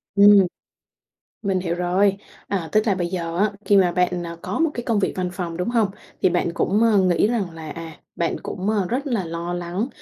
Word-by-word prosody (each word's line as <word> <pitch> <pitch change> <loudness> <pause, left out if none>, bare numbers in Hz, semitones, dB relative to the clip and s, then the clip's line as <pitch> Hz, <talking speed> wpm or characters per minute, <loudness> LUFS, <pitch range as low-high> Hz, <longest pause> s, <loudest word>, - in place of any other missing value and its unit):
Ừm, 205 0 +8 1.1
mình 190 -2 0
hiểu 170 -2 -2
rồi. 185 +3 +2 0.3
À, 180 -5 -2
tức 215 +1 +3
là 205 - +3
bây 175 -2 -1
giờ 170 -2 -3
á, 210 +1 +2
khi 205 - +4
mà 180 -3 +4
bạn, 180 -1 0
à, 170 - -7
có - - -3
một 325 -2 +2
cái 240 - -3
công 225 -3 +1
việc 195 - +1
văn 180 -1 -1
phòng, 175 -3 -4
đúng 180 +5 -2
hông? 230 -4 +2 0.3
Thì 185 - +6
bạn 175 -1 0
cũng, 205 +6 +1
ờ, 220 -3 +4
nghĩ 185 0 +3
rằng 215 -6 -1
là, 160 -1 -9
à, 165 -2 -8 0.2
bạn 170 - 0
cũng, 190 +3 -3
à, 205 -3 +1
rất 270 +7 -2
là 230 -8 0
lo 170 +1 -4
lắng 175 +6 -3
185 Hz, 230 wpm, -22 LUFS, 175-205 Hz, 1.1 s, Ừm